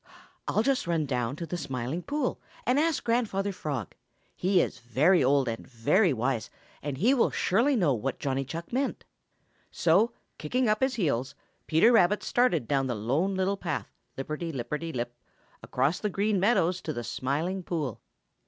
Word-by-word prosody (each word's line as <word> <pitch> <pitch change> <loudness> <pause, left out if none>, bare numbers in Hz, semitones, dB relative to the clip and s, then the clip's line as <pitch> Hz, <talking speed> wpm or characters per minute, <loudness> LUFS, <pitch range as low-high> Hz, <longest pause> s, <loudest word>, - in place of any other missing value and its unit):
"I'll 215 - +2
just 270 -7 +1
run 165 -3 +1
down 125 -2 -1
to 170 - -5
the 175 +2 -4
Smiling 130 +2 -3
Pool 285 +4 -2 0.2
and 255 +3 +3
ask 320 -1 +1
Grandfather 220 -4 0
Frog. 140 - -4 0.4
He 185 0 +2
is 125 - -1
very 135 +10 +3
old 135 0 +3
and 115 -1 -4
very 160 - +2
wise, 125 -1 -1 0.3
and 145 -2 -4
he 225 - +4
will 250 - +3
surely 240 +9 +2
know 175 - +3
what 125 +3 -2
Johnny 135 -1 -1
Chuck 165 - -7
meant." 270 +2 -1 0.6
So, 190 +8 +3 0.3
kicking 250 +11 0
up 215 0 +2
his 265 -1 +2
heels, 140 - -1 0.3
Peter 165 +9 +5
Rabbit 210 -2 +4
started 210 - +2
down 135 -2 +1
the 125 - -1
Lone 140 - 0
Little 190 +1 0
Path, 175 - -4 0.2
lip 135 - -3
perty 165 +2 -3
lipperty 150 +5 -4
lip, 120 -2 -3 0.5
across 135 +7 0
the 210 - -1
Green 200 +1 +1
Meadows 185 -3 +2
to 155 - -4
the 120 - -4
Smiling 155 +11 -2
Pool. 155 - -3
165 Hz, 170 wpm, -28 LUFS, 135-205 Hz, 0.6 s, Peter